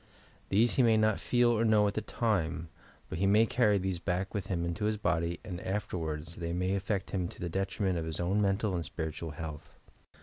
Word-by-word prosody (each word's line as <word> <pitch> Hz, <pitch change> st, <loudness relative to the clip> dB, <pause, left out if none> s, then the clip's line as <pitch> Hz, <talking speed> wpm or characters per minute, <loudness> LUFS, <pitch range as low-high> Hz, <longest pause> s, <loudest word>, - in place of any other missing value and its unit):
These 115 Hz, +7 st, +3 dB
he -, -, +6 dB
may 115 Hz, -2 st, +5 dB
not 110 Hz, -1 st, +3 dB
feel 120 Hz, -1 st, +3 dB
or 115 Hz, -1 st, +2 dB
know 110 Hz, -2 st, +4 dB
at 100 Hz, -, -1 dB
the 110 Hz, -, -1 dB
time, 90 Hz, -8 st, -1 dB, 0.4 s
but -, -, -5 dB
he 95 Hz, -, +3 dB
may 105 Hz, +3 st, +5 dB
carry 110 Hz, -3 st, +3 dB
these 95 Hz, -2 st, -2 dB
back 90 Hz, +2 st, -2 dB
with 100 Hz, -3 st, -3 dB
him 85 Hz, -3 st, -1 dB
into 85 Hz, +5 st, -2 dB
his 105 Hz, 0 st, +1 dB
body 85 Hz, -3 st, 0 dB
and 90 Hz, -4 st, -5 dB
afterwards 85 Hz, -6 st, -3 dB
they 85 Hz, -1 st, -3 dB
may 90 Hz, +2 st, 0 dB
affect 100 Hz, 0 st, -2 dB
him 90 Hz, -3 st, -1 dB
to -, -, -11 dB
the 90 Hz, -, -3 dB
detriment 95 Hz, 0 st, -1 dB
of 80 Hz, -, -3 dB
his 80 Hz, -1 st, -4 dB
own 95 Hz, +4 st, +1 dB
mental 100 Hz, +1 st, +1 dB
and 85 Hz, -2 st, -1 dB
spirit 80 Hz, -1 st, -4 dB
ual 80 Hz, -3 st, -6 dB
health. 75 Hz, -2 st, -7 dB
95 Hz, 225 wpm, -31 LUFS, 85-105 Hz, 0.4 s, he